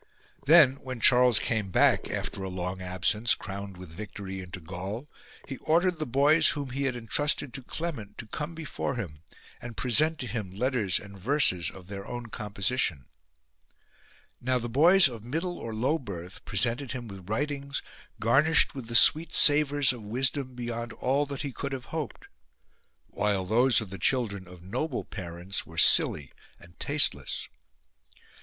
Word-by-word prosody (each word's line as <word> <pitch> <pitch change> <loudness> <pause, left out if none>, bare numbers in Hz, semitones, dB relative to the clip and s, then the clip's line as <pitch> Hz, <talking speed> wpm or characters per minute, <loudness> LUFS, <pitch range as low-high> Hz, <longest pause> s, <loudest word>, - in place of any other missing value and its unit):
Then 150 -4 +7
when 130 -3 -7
Charles 125 -1 +6
came 110 -3 0
back, - - +3
after 100 - -4
a 95 - -4
long 90 0 -4
absence, 95 +5 +1
crowned 95 +1 -7
with 90 -3 -11
victory, 95 +1 -7
into 90 0 -7
Gaul, 95 - -6 0.4
he 135 - -5
ordered 175 +3 +1
the 155 - -3
boys 145 +6 +5
whom 140 -3 -2
he 140 +2 -2
had 130 -2 -1
entrusted 130 +3 0
to 135 - -5
Clement 125 -8 -6
to - - -7
come 150 +9 -5
before 155 -3 -4
him 85 -11 -6 0.4
and 120 -2 -9
present 155 +6 +2
to 125 - -5
him 110 -4 -4
letters 115 -5 0
and 100 -1 -11
verses 95 - +2
of 95 -2 -13
their 100 +1 -7
own 120 -1 -6
composition. 100 - -1 1.4
Now 130 +1 +1
the 120 -1 -3
boys 165 +9 +6
of 115 -5 -8
middle 165 +9 -3
or 115 - -6
low 130 +9 0
birth 95 -3 -8
presented 120 +6 -1
him 125 -3 -6
with 95 -2 -11
writings 140 +3 -2 0.4
garnished 140 +9 +4
with 130 -4 -8
the 115 - -4
sweet 155 +7 +7
savours 145 -2 +5
of 120 - -9
wisdom 130 +4 -1
beyond 120 -1 -5
all 135 +5 0
that 140 -1 -5
he 140 - -4
could 140 +2 -5
have 130 -2 -6
hoped, 160 -3 -5 0.8
while 100 -3 -1
those 120 +6 +4
of 105 -4 -8
the 95 - -7
children 100 -4 0
of 90 -1 -13
noble 125 - -3
parents 90 0 -4
were 80 - -13
silly 70 -4 +3 0.3
and 85 0 -18
tasteless. - - 0
120 Hz, 165 wpm, -28 LUFS, 100-140 Hz, 1.4 s, Then